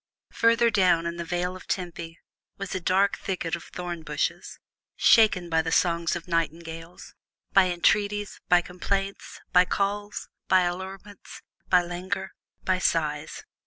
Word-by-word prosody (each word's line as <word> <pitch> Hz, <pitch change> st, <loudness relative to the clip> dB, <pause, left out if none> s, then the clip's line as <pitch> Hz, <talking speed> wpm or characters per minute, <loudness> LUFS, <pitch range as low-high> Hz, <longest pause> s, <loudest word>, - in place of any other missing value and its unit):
Farther 230 Hz, 0 st, +4 dB
down 180 Hz, -5 st, +3 dB
in 170 Hz, 0 st, -3 dB
the 170 Hz, -, -3 dB
Vale 180 Hz, +1 st, -2 dB
of 185 Hz, -, -12 dB
Tempe 170 Hz, -2 st, -4 dB, 0.4 s
was 195 Hz, -1 st, -5 dB
a 185 Hz, -, -1 dB
dark 190 Hz, +3 st, +2 dB
thicket 175 Hz, -3 st, -2 dB
of 170 Hz, -, -10 dB
thorn 175 Hz, -2 st, -6 dB
bushes, 150 Hz, -2 st, -3 dB, 0.4 s
shaken 210 Hz, -6 st, +5 dB
by 165 Hz, -1 st, +2 dB
the 160 Hz, 0 st, -3 dB
songs 170 Hz, -1 st, +2 dB
of 175 Hz, +1 st, -7 dB
nightingales 165 Hz, 0 st, -4 dB, 0.4 s
by 195 Hz, -1 st, +6 dB
entreaties, 205 Hz, +3 st, +1 dB
by 180 Hz, 0 st, +6 dB
complaints, 195 Hz, +3 st, -4 dB
by 180 Hz, 0 st, +7 dB
calls, 205 Hz, +2 st, -2 dB, 0.2 s
by 185 Hz, -1 st, +5 dB
allurements, 190 Hz, +3 st, -6 dB, 0.3 s
by 180 Hz, -1 st, +5 dB
languor, 190 Hz, +3 st, -4 dB, 0.3 s
by 185 Hz, -1 st, +1 dB
sighs. 155 Hz, -3 st, -1 dB
180 Hz, 140 wpm, -26 LUFS, 170-195 Hz, 0.4 s, by